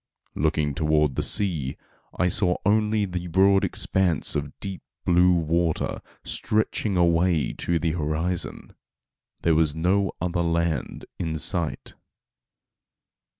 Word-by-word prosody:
Looking 75 -1 0
toward 75 -1 +2
the - - -1
sea, 80 -10 -1 0.4
I 90 - +2
saw 90 -1 +1
only 105 0 +2
the 90 -2 -4
broad 95 +3 +4
expanse 90 -6 +1
of 70 -1 -4
deep 95 -2 -6 0.2
blue 90 +1 +5
water 85 -1 0 0.2
stretching 105 -2 -1
away 85 -2 +2
to 85 - 0
the 85 0 0
horizon. 80 +2 -3 0.7
There 85 - +3
was 80 -1 +2
no 95 +5 +1
other 90 0 -1
land 85 -4 -1
in 80 -1 -2
sight. 85 0 -2
85 Hz, 115 wpm, -25 LUFS, 80-95 Hz, 0.7 s, blue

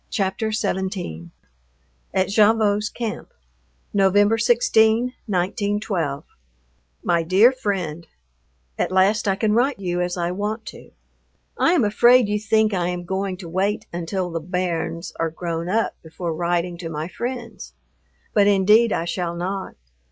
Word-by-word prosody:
XVII 190 - -2 0.8
AT 190 -1 +1
GAVOTTE'S 210 0 +3
CAMP 230 -3 -5 0.6
November 205 +2 +4
16, 230 0 +3
1912. 190 -5 -1 0.8
MY 170 -1 +2
DEAR 190 +9 +5
FRIEND, 185 -10 -3 0.7
At - - 0
last 195 +4 +3
I 195 - +2
can 210 +1 +1
write 255 +5 +2
you 180 -2 -2
as 180 0 -2
I 175 0 -1
want 210 +4 -3
to. - - -14 0.7
I 335 - +3
am 335 - +3
afraid 240 +3 +5
you 210 0 0
think 215 0 +2
I 175 -2 0
am 180 0 -4
going 190 +1 -2
to 180 -2 -9
wait 190 +5 -1
until 175 +1 -3
the 165 - -2
"bairns" 170 0 -3
are 165 - 0
grown 165 +1 -4
up 225 +4 +1
before 165 +1 -5
writing 175 +1 -1
to 165 -2 -5
my 155 0 -4
friends, 235 - -6 0.6
but 205 -1 +4
indeed 210 +3 +4
I 165 - -1
shall 170 0 -3
not. 190 +3 -4
190 Hz, 135 wpm, -22 LUFS, 175-215 Hz, 0.8 s, DEAR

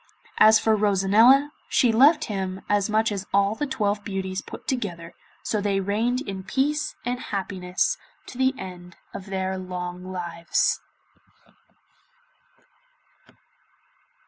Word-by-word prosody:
As 220 +1 +8
for 220 0 +2
Rosanella, 215 +8 +4 0.2
she 245 - +3
loved 290 +7 +5
him 190 -2 -4
as 205 0 +1
much 220 +1 +2
as 200 -1 -4
all 200 +1 +3
the 290 +6 -3
twelve 210 -6 -1
beauties 190 -1 -3
put - - -11
together, 175 -10 -3 0.3
so 215 - -1
they 200 -1 0
reigned 225 +6 0
in 195 -6 -5
peace 285 +9 -1
and 245 +1 -2
happiness 190 - -2 0.3
to 255 - -11
the 260 +1 +2
end 180 -2 -9 0.2
of 195 - -8
their 190 0 -2
long 180 0 -6
lives. 170 -2 -1
200 Hz, 120 wpm, -24 LUFS, 185-235 Hz, 0.3 s, As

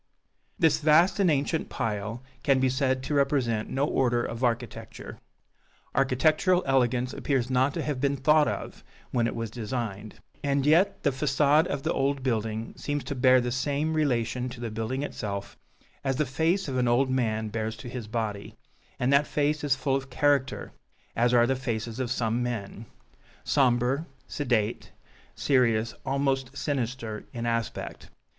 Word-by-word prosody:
This 160 -3 +3
vast 165 +6 +4
and 190 -3 +4
ancient 150 +2 0
pile 110 0 -3 0.2
can 135 -2 +3
be 130 0 +3
said 130 0 0
to 150 - -3
represent 135 -6 +1
no 135 +2 0
order 120 -4 +1
of 115 +2 -5
architecture. 120 -1 -3 0.7
Architectural 155 +7 +3
elegance 130 -2 +1
appears 130 -3 -1
not 130 +2 +2
to - - -2
have 145 -4 -3
been 140 0 +1
thought 150 +3 +4
of - - -5 0.3
when 120 -2 +1
it - - -4
was 115 -2 -4
designed, 110 -3 -4 0.3
and 140 -1 +1
yet 165 +6 +3
the 145 - +3
façade 145 +4 +3
of 140 -1 -3
the - - 0
old 135 0 0
building 110 -2 -2
seems 145 -1 -3
to 145 - -4
bear 130 -1 +5
the 120 0 -2
same 145 +4 -1
relation 125 -4 0
to 125 -1 -10
the 120 -2 -4
building 115 +5 -3
itself 100 -8 -5 0.5
as 135 -1 0
the 150 +3 +1
face 160 +8 0
of 130 -2 -2
an 125 -1 +2
old 130 +3 +3
man 110 -4 0
bears 110 +1 -3
to 110 - -9
his 120 -2 -6
body, 105 -3 -4 0.4
and 125 +3 +2
that 140 +1 +4
face 150 0 0
is 140 -2 +2
full 135 0 0
of 135 0 -3
character, 140 0 +1 0.4
as 120 +1 +3
are 120 -1 +5
the 135 +2 +1
faces 115 -2 -4
of 130 -2 -1
some 120 -1 0
men 115 -2 -4 0.6
sombre, 130 +2 +2 0.2
sedate, 120 -6 -1 0.4
serious, 115 -4 +2
almost 135 -1 0
sinister 120 -6 -3
in 120 -1 -4
aspect. 115 -1 -3
130 Hz, 165 wpm, -27 LUFS, 115-140 Hz, 0.7 s, bear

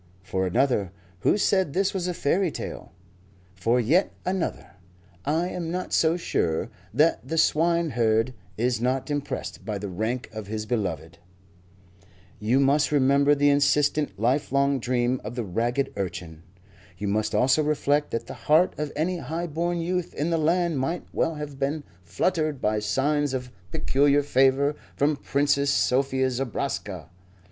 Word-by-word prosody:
For 95 0 -1
another, 100 -2 +1 0.3
who 145 - +2
said 190 -7 +2
this 195 +3 +1
was 185 -2 -2
a 180 - -2
fairy 175 +6 +1
tale? - - -7 0.6
For 115 +6 +1
yet 155 - +2
another, 185 -2 -2 0.5
I 165 +4 +1
am 170 -3 -4
not 180 +2 -4
so 165 +1 +3
sure 85 - -1 0.2
that 155 +3 +2
the 165 - -2
swineherd 145 -9 +2 0.2
is 120 0 0
not 130 +3 -1
impressed 145 -1 -4
by 105 -2 -3
the 100 0 -5
rank 110 +7 -2
of 110 -2 -6
his 110 0 -4
beloved. 85 -7 -3 1.2
You 115 +6 +2
must 140 +2 +3
remember 140 +1 +4
the 145 0 +4
insistent, 145 -5 +2
lifelong 140 +3 +1
dream 125 +1 0
of 110 +3 -6
the 120 - -2
ragged 120 +8 -1
urchin. 85 -4 -5 0.6
You 100 +3 -3
must 105 +2 0
also 130 +7 +4
reflect 150 -1 +1
that 115 0 -3
the - - -8
heart 160 +4 +3
of 150 -1 -2
any 175 +4 -1
high 165 +2 -3
born 170 +2 -2
youth 180 +1 -2
in 155 +4 -1
the 165 - +1
land 170 -1 +1
might 165 +7 -2
well 165 - 0
have 145 -2 -7
been 145 +2 -1 0.2
fluttered 155 - -1
by 105 -1 +1
signs 135 +6 0
of 125 -1 -5 0.2
peculiar 145 -2 +2
favour 135 +1 +3 0.2
from 145 +2 +2
Princess 140 0 +1
Sophie 130 -1 +2
Zobraska. 130 -2 -3
140 Hz, 150 wpm, -25 LUFS, 115-155 Hz, 1.2 s, remember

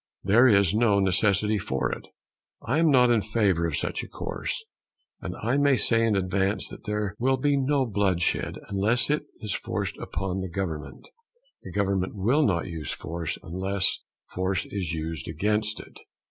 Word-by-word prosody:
There 115 +7 +6
is 100 -5 +4
no 110 -2 +3
necessity 100 +2 +2
for 65 -8 -1
it. - - -6 0.6
I 135 +7 +1
am 165 -1 +4
not 125 -3 +5
in 115 -2 +3
favour 100 -6 +1
of - - -2
such - - -2
a - - -8
course; 450 - -4 0.6
and - - -5
I - - +1
may 140 -2 +4
say 115 -1 +3
in 110 -2 +2
advance 95 +1 0
that - - -11
there 105 -2 -2
will 130 +2 +2
be 145 +2 +2
no 135 0 +2
bloodshed 95 -6 0
unless 110 +7 +1
it 150 - -1
is 105 -3 -3
forced - - -3
upon 95 0 -3
the 95 - -4
government. 85 -4 -5 0.5
The - - -9
government 100 -1 0
will 120 +10 +2
not 90 - +1
use 80 -4 -6
force 85 -1 -4
unless 95 +3 0 0.3
force 95 +1 -1
is 95 -5 -3
used 80 -2 -4
against 105 +6 0
it. - - -12
100 Hz, 170 wpm, -26 LUFS, 95-115 Hz, 0.6 s, There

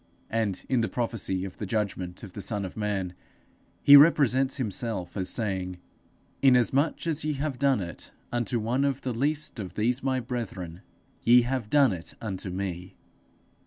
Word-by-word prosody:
And 110 -4 -1
in 130 -3 +2
the 110 - -1
prophecy 100 -5 -2
of 95 - -9
the 105 - -5
judgment 95 -4 -3
of 100 -4 -9
the 100 - -6
Son 100 -1 -2
of 95 - -8
man, 100 -4 -2 0.7
he 145 - +10
represents 140 -3 +5
himself 110 -6 -3
as 95 -3 -1
saying, 95 -5 -1 0.6
'Inasmuch 135 +4 +3
as 160 -2 0
ye 155 0 0
have 140 -2 -3
done 135 -5 +3
it 85 -2 -7 0.2
unto 120 0 0
one 120 +5 0
of 140 -1 0
the 125 - -2
least 145 +2 -1
of 95 -4 -6
these 120 +4 +1
my 130 -1 0
brethren, 100 -9 -5 0.4
ye 120 +1 +6
have 125 -3 -2
done 140 -6 +4
it 85 -2 -7
unto 95 -3 -4
me.' 90 -1 -5
115 Hz, 165 wpm, -27 LUFS, 95-130 Hz, 0.7 s, he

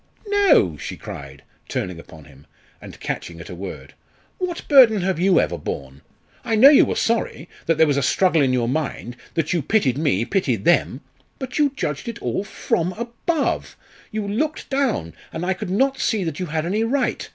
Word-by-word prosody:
no!" 395 - +4
she - - -6
cried, 70 0 -9 0.3
turning 90 -2 -3
upon 80 -2 -13
him, 70 -1 -18 0.3
and - - -11
catching 85 -1 -5
at 80 - -9
a - - -6
word; 95 +3 -8 0.5
"what 360 -2 -4
burden 245 -8 +7
have 185 -2 -1
you 185 -1 +4
ever - - -1
borne? 70 +1 -6 0.4
I 230 -2 0
know 255 +6 +9
you 290 - +7
were - - -2
sorry 225 -8 -1 0.2
that 165 -1 +2
there 160 - +6
was 145 -2 +1
a - - +2
struggle 160 +5 +3
in 135 -2 +3
your 125 -2 +1
mind 130 -3 -3 0.2
that 165 +1 0
you 170 - +1
pitied 140 - +1
me 115 - +1
pitied 130 - -1
them. 175 - +2 0.4
But 265 +2 -5
you 290 -2 +3
judged 150 - -3
it 235 0 -5
all - - -2
from 180 -3 -1
above 240 - -2 0.3
you 215 -1 -3
looked 295 +11 -2
down 260 - 0 0.2
and 165 +2 -4
I 190 - +1
could 190 +1 -6
not 265 +8 +1
see 215 -4 0
that 160 -2 -4
you 180 - -3
had 160 +1 -2
any 205 +6 0
right. 250 +3 -1
180 Hz, 195 wpm, -22 LUFS, -, 0.5 s, know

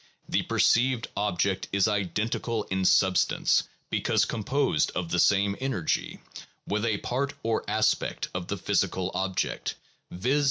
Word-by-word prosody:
The - - +1
perceived 120 -1 +2
object 100 -2 0
is 100 0 +3
identical 105 +3 -1
in 95 0 0
substance 95 0 +3 0.3
(because - - +2
composed 135 +6 0
of 90 -2 -2
the 90 - +1
same 100 +1 +3
energy) 130 -11 -2 0.5
with 105 +2 -1
a 110 -3 +1
part 135 +6 -2
or 115 0 0
aspect - - 0
of 90 -1 -4
the 100 - -3
physical 95 0 0
object, 95 -1 -2 0.3
viz. 125 +11 0
100 Hz, 130 wpm, -27 LUFS, 95-115 Hz, 0.5 s, is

